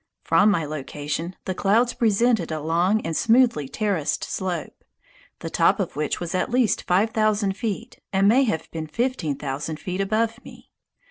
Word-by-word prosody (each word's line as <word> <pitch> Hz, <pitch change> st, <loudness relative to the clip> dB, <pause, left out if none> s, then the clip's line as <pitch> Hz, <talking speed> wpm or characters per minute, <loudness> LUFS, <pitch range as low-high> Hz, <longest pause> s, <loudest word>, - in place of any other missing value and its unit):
From 210 Hz, -, +4 dB
my 170 Hz, -6 st, +1 dB
location, 150 Hz, +3 st, -4 dB
the 185 Hz, -, -2 dB
clouds 225 Hz, +6 st, +2 dB
presented 230 Hz, -5 st, +2 dB
a 155 Hz, -, -2 dB
long 170 Hz, +7 st, +1 dB
and 165 Hz, -, -3 dB
smoothly 230 Hz, -, +3 dB
terraced 195 Hz, -7 st, -1 dB
slope, 180 Hz, -4 st, -4 dB, 0.6 s
the -, -, -4 dB
top -, -, +3 dB
of -, -, -2 dB
which 150 Hz, 0 st, -1 dB
was 175 Hz, +1 st, -4 dB
at 185 Hz, +6 st, 0 dB
least 245 Hz, -2 st, +1 dB
five 195 Hz, +5 st, +2 dB
thousand 215 Hz, -3 st, +1 dB
feet 225 Hz, +2 st, -5 dB
and 195 Hz, +1 st, +3 dB
may 255 Hz, +6 st, +5 dB
have 160 Hz, -9 st, -2 dB
been 160 Hz, -1 st, -5 dB
fifteen 225 Hz, -, -1 dB
thousand 145 Hz, +4 st, -4 dB
feet 185 Hz, +1 st, -3 dB
above 220 Hz, +3 st, -1 dB
me. -, -, -14 dB
195 Hz, 165 wpm, -24 LUFS, 160-225 Hz, 0.6 s, may